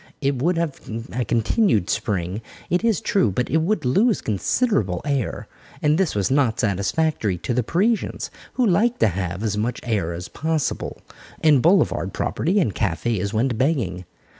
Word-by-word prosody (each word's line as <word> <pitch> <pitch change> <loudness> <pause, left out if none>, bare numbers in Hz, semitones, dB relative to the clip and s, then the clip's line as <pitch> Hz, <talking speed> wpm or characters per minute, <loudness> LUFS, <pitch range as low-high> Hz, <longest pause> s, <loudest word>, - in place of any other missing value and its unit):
It 135 -3 0
would 170 +4 +2
have 165 -4 -2 0.3
a 125 +1 0
continued 115 - +2
Spring, 95 +1 -2 0.3
it 180 +4 +2
is 225 -6 +2
true, 195 - +2
but 110 +6 -2
it 160 - +3
would 170 +1 0
lose 205 - +3
considerable 105 - 0
air. 140 -5 -2 0.3
And 150 0 +3
this 190 - +1
was 100 +3 0
not 130 -4 +2
satisfactory 105 - 0
to 120 - -3
the 125 - +2
Parisians, 200 - 0 0.2
who 255 - +1
like 225 +5 +2
to - - +3
have 90 +1 -3
as 105 -2 -1
much 120 +3 -1
air 100 -8 -1
as 85 +1 -6
possible, 160 -1 -2 0.4
and 150 -5 +5
boulevard 170 - +2
property 185 +6 0
and 115 - +1
cafés 100 +1 -1
went 115 +1 0
begging. 115 - 0
125 Hz, 165 wpm, -22 LUFS, 100-165 Hz, 0.4 s, and